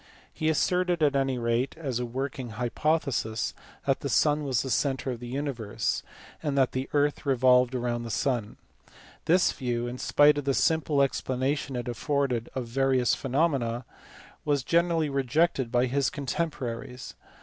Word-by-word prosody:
He 155 - 0
asserted, 180 +1 +1
at 145 -1 +3
any 135 -2 +1
rate 115 +2 0
as 135 -7 -3
a 125 - -2
working 130 0 -4
hypothesis, 125 -3 0 0.3
that - - +1
the - - -4
sun 150 0 +3
was 130 -5 0
the 130 - -4
centre 135 +2 0
of 120 - -5
the 120 - -8
universe, 120 -5 -2 0.4
and 145 -3 -1
that 135 -2 +3
the 130 +1 -3
earth 145 0 +1
revolved 125 -2 +4
round 120 -1 -1
the 115 - -6
sun. 120 -2 -1 0.7
This 175 +3 +4
view, 120 -2 -2
in 120 +1 -5
spite 145 0 +4
of 145 - -6
the 135 -1 +1
simple 150 +4 +2
explanation 135 +1 -1
it 120 0 -4
afforded 125 -1 -1
of 130 -2 -2
various 130 0 +2
phenomena, 130 -4 0 0.6
was 145 -3 +1
generally 170 +1 +2
rejected 135 -1 +1
by 125 +1 +3
his 135 +1 +1
contemporaries. 130 -4 -4
135 Hz, 155 wpm, -27 LUFS, 120-145 Hz, 0.7 s, revolved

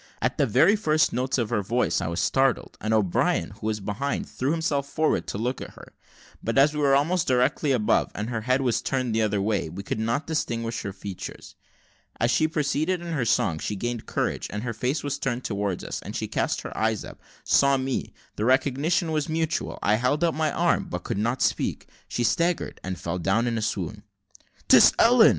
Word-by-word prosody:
At - - -1
the - - +3
very 205 - +5
first 155 -7 +2
notes 130 +2 0
of 115 -4 -1
her 105 - +1
voice 120 +5 0
I - - -2
was 85 +2 -2
startled, 135 -2 +1
and 110 - -2
O'Brien, 105 -5 +1
who 110 - -7
was 110 -1 -1
behind, 105 +8 -3
threw 130 - -2
himself 150 -3 0
forward 155 +2 0
to - - -4
look 120 +4 -2
at - - -9
her; - - -14 0.5
but 115 - -1
as 145 +3 +5
we 150 - -3
were 140 -2 +4
almost 160 +5 +1
directly 130 +3 +2
above, 115 -5 +2
and 105 +2 -3
her 115 -2 -2
head 130 +4 +1
was 125 -3 +1
turned 130 -3 -1
the 110 - +2
other 105 -2 +1
way, 100 -4 0
we 95 +5 -7
could 105 - -3
not 115 +6 -1
distinguish 115 -7 -2
her 100 - -4
features. 95 -1 -8 0.7
As 120 +2 +2
she 155 +6 +3
proceeded 155 +3 0
in 170 -1 -5
her 130 -6 0
song, 85 -7 +1
she 105 - -3
gained 120 +2 -4
courage, - - -2
and 105 +1 -5
her 120 -2 -3
face 125 +7 -1
was 145 -1 -2
turned 125 -1 -2
towards 100 -3 -2
us, - - -5
and - - -8
she - - -2
cast - - -1
her - - -8
eyes 110 -1 0
up - - -11 0.2
saw 140 0 +4
me 130 0 -2 0.3
the 105 - -1
recognition 140 +6 +2
was 155 0 -1
mutual 160 0 -1
I 105 +1 +3
held 130 +7 +1
out 170 - +2
my 155 -1 0
arm, 175 0 +1
but 90 0 -4
could - - -3
not 120 +4 0
speak - - -1 0.2
she 120 - -2
staggered, 170 +8 0
and 95 -2 -4
fell 85 +2 -3
down 95 +7 +1
in 120 -1 0
a 110 - -1
swoon. 110 - -3 0.7
"'Tis - - +8
Ellen!" 230 -1 +7
125 Hz, 215 wpm, -25 LUFS, 110-150 Hz, 0.7 s, Tis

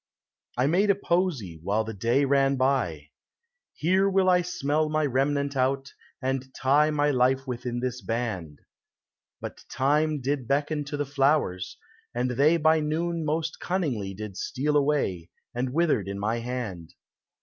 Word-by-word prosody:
I 125 - +3
made 185 +8 +3
a 200 - +5
posie, 170 - -1
while 100 +5 0
the 110 0 -6
day 115 +7 +2
ran 135 0 +3
by: 125 - 0 0.3
" - - -51 0.3
Here 190 +4 +2
will 190 -1 +3
I 180 0 +4
smell 155 -3 0
my 155 0 +1
remnant 140 +1 0
out, 135 +1 0 0.3
and 130 0 -2
tie 145 +3 +3
My 145 -1 +2
life 130 +1 +2
within 120 -1 -4
this 125 -1 -3
band." 110 -10 -3 0.8
But - - -7
Time 150 +3 +1
did 135 -1 -2
beckon 145 +2 0
to 145 +1 -4
the 145 - -1
flowers, 135 -10 +1 0.4
and 125 +1 0
they 145 +7 +4
By 160 0 +4
noon 165 +2 -1
most 155 +1 -2
cunningly 130 - -2
did 105 -1 -7
steal 150 +3 -1
away, 140 - +1 0.2
And 125 +1 -2
withered 145 - +1
in 100 0 -4
my 110 +4 -1
hand. 115 -9 -5
135 Hz, 155 wpm, -26 LUFS, 120-150 Hz, 0.8 s, a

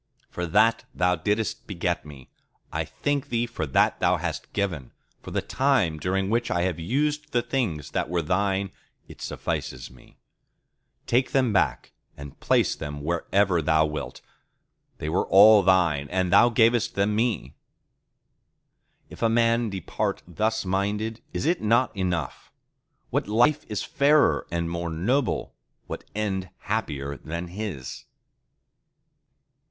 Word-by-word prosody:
For 90 0 -3
that 110 +6 +3
Thou 90 0 +2
didst 105 +6 -2
beget 85 -4 -2
me, 70 -4 -13 0.4
I - - -1
thank 145 0 -2
Thee 120 0 0
for 115 -10 -4
that 65 - +2
Thou - - +3
hast - - -5
given: 90 -11 -3 0.3
for - - -9
the - - -2
time 125 - +1
during 95 +3 0
which 120 +1 +1
I 90 -5 +1
have 90 -3 -1
used 150 - -1
the 120 -1 +2
things 115 - -2
that - - -1
were 85 -1 0
Thine, 95 +3 0 0.4
it - - -13
suffices 60 -1 -4
me. 65 -1 -19 0.9
Take 125 +2 +1
them 130 -5 +2
back 95 - 0 0.3
and 70 -1 -10
place - - +2
them 75 0 -6
wherever 85 +2 +1
Thou 80 0 +3
wilt! 75 -1 -5 0.8
They 75 - -5
were 85 +4 0
all 105 +2 +8
Thine, 90 -7 +2
and 90 0 0
Thou 120 +4 +7
gavest 115 -1 +2
them 100 +1 +1
me."—If 115 0 -8
a 115 - +3
man 115 0 +2
depart 95 -3 -3
thus 110 +4 -1
minded, 105 +4 -1
is - - -3
it 170 +2 +1
not 115 +3 +2
enough? 90 -3 -3 0.6
What - - 0
life 125 +8 +2
is 105 - -3
fairer 145 +2 +3
and 85 0 -2
more 85 0 -3
noble, 115 - -1 0.3
what - - -7
end 95 -4 -2
happier 75 -10 -3
than 85 +2 -6
his? 90 -9 -6
100 Hz, 140 wpm, -25 LUFS, 85-115 Hz, 0.9 s, all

